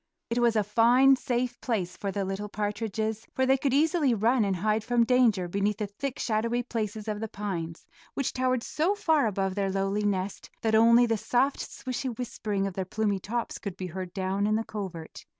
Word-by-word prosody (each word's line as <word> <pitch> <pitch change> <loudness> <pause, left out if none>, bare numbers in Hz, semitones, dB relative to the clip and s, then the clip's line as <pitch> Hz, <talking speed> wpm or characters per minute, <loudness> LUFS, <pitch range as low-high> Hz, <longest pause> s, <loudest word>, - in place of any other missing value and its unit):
It 235 - +1
was 235 -1 +3
a 215 - +3
fine, 240 +6 +5
safe 245 -1 -2
place 185 -7 -2
for 200 - -3
the 200 0 -2
little 195 +2 -4
partridges, 215 +1 -3
for 260 - +2
they 265 +1 +4
could 270 0 0
easily 295 -2 +3
run 230 +3 +3
and 195 -2 0
hide 215 +4 0
from 240 0 +3
danger 230 -7 +3
beneath 200 +3 0
the 215 - -2
thick 240 +7 -5
shadowy 230 +2 0
places 220 -3 -4
of 210 -1 -2
the 225 - -3
pines, 180 -6 -5 0.3
which 275 - -1
towered 255 -2 0
so 345 +7 0
far 320 - +2
above 195 -2 -1
their 195 0 -1
lowly 195 +2 -1
nest 195 -1 -2
that 220 -1 +1
only 235 +2 +6
the 225 -1 +1
soft, 255 +6 +1
swishy 255 +1 -4
whispering 210 -5 -2
of 195 - -3
their 190 - -2
plumy 205 +1 -1
tops 230 +5 -3
could 195 -3 -6
be 185 - -4
heard 185 -1 -5
down 195 +2 -1
in 215 - +2
the 225 - 0
covert. 185 -6 -7
215 Hz, 205 wpm, -28 LUFS, 195-245 Hz, 0.3 s, only